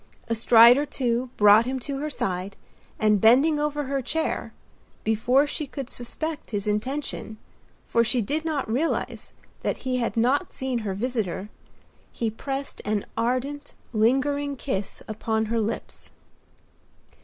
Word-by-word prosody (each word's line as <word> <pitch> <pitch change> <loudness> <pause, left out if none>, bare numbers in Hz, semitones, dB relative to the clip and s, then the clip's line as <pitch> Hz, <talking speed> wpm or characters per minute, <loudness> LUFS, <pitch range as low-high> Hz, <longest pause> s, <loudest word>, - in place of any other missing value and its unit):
A 230 - 0
stride 235 +2 +7
or 290 - 0
two 245 -2 -1
brought 210 +3 +6
him 260 0 -2
to 275 +1 -4
her 305 +2 -2
side, 190 -6 -3 0.4
and 210 -2 +3
bending 275 +7 +5
over 295 0 -1
her 275 0 -2
chair—before 250 -3 -1
she 295 0 -3
could 270 -1 -7
suspect 310 +6 -5
his 205 -3 -3
intention, 220 +1 -3 0.5
for 230 - +2
she 240 +2 +2
did 295 +9 -1
not 310 -4 -2
realize 260 +9 -2 0.3
that - - -3
he 255 -1 0
had 235 -1 -2
not 250 +5 +2
seen 260 -2 -2
her 200 -4 -3
visitor—he 220 0 -5
pressed 270 +5 -5
an 210 -1 -1
ardent, 265 +5 -2 0.2
lingering 280 +6 +1
kiss 205 -7 -4
upon 220 0 -1
her 230 +1 0
lips. 215 +1 -5
245 Hz, 135 wpm, -25 LUFS, 220-280 Hz, 0.5 s, stride